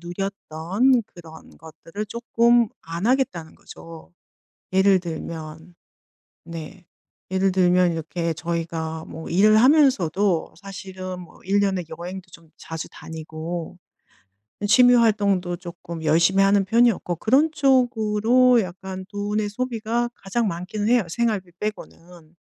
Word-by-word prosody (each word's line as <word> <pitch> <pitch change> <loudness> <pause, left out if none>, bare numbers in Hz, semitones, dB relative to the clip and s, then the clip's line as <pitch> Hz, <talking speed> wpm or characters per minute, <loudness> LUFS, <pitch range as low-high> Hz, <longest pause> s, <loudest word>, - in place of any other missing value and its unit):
누렸던 195 +6 0
그런 160 -2 -14
것들을 165 +6 -8
쪼끔 235 +1 +2
안 170 +4 -4
하겠다."는 235 -11 0
거죠. 165 0 -13 0.6
예를 190 0 +4
들면 160 0 -7 0.7
네 170 +2 -9 0.5
예를 190 +1 +2
들면 180 -1 +3
이렇게 165 +1 -3
저희가 160 0 -4
뭐 160 +1 -9
일을 210 +5 +5
하면서도 210 - +3
사실은 190 -2 -7
뭐 175 - -15
1 200 +2 +2
년에 195 -3 0
여행도 180 +2 -8
좀 165 -2 -16
자주 160 -1 -7
다니고 160 +2 -7 0.8
이 - - -1
취미 245 +3 +6
활동도 200 -6 +2
쪼끔 170 -2 -9
열심히 170 +5 +3
하는 195 0 +3
편이었고 225 -5 +2
그런 275 - +3
쪽으로 250 -2 +3
약간 190 0 -7
돈의 205 +1 -2
소비가 235 +1 -2
가장 225 +4 -2
많기는 205 +4 -3
해요 245 -2 +4
생활비 210 -3 -1
빼고는. 175 -5 -8
190 Hz, 255 characters per minute, -23 LUFS, 170-215 Hz, 0.8 s, 취미